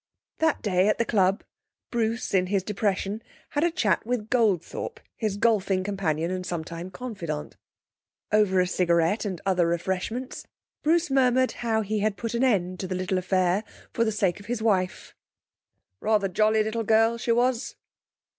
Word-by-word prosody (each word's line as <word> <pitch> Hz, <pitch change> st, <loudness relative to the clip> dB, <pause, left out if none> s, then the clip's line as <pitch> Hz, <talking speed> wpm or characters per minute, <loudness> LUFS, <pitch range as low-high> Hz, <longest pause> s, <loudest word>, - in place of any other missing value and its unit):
That 320 Hz, -1 st, +1 dB
day 190 Hz, -2 st, +2 dB
at 215 Hz, -, +2 dB
the 235 Hz, -, +1 dB
club, 195 Hz, -2 st, +2 dB, 0.5 s
Bruce 230 Hz, 0 st, -1 dB
in 185 Hz, -1 st, +3 dB
his 195 Hz, -1 st, 0 dB
depression 205 Hz, 0 st, -1 dB, 0.3 s
had 290 Hz, -, 0 dB
a 345 Hz, -, +4 dB
chat 240 Hz, -, +1 dB
with 225 Hz, -2 st, -3 dB
Goldthorpe, 230 Hz, -, 0 dB, 0.2 s
his 215 Hz, -3 st, -2 dB
golfing 200 Hz, -4 st, +2 dB
companion 175 Hz, -4 st, -1 dB
and 185 Hz, 0 st, -3 dB
sometime 170 Hz, 0 st, -5 dB
confidant. 185 Hz, -11 st, -5 dB, 0.8 s
Over 210 Hz, -3 st, +3 dB
a 180 Hz, -, +4 dB
cigarette 175 Hz, +2 st, +1 dB
and 185 Hz, -4 st, -3 dB
other 180 Hz, -3 st, +2 dB
refreshments, 190 Hz, +9 st, -3 dB, 0.3 s
Bruce 330 Hz, 0 st, +2 dB
murmured 260 Hz, -1 st, +3 dB
how 225 Hz, -2 st, +1 dB
he 215 Hz, 0 st, -1 dB
had 205 Hz, -1 st, 0 dB
put 230 Hz, -1 st, -4 dB
an 235 Hz, +2 st, +1 dB
end 185 Hz, -7 st, +1 dB
to 190 Hz, -, -3 dB
the 185 Hz, -, -3 dB
little 185 Hz, +1 st, -1 dB
affair 185 Hz, +1 st, +1 dB, 0.3 s
for 230 Hz, -, +2 dB
the 220 Hz, -, +1 dB
sake 200 Hz, -5 st, 0 dB
of 200 Hz, -, -13 dB
his 240 Hz, -1 st, -2 dB
wife. 195 Hz, -5 st, 0 dB, 0.8 s
'Rather 215 Hz, -2 st, +2 dB
jolly 215 Hz, +3 st, +2 dB
little 220 Hz, +2 st, -2 dB
girl, 225 Hz, +2 st, +3 dB
she 235 Hz, -, 0 dB
was.' 245 Hz, +1 st, +1 dB
205 Hz, 165 wpm, -26 LUFS, 185-230 Hz, 0.8 s, a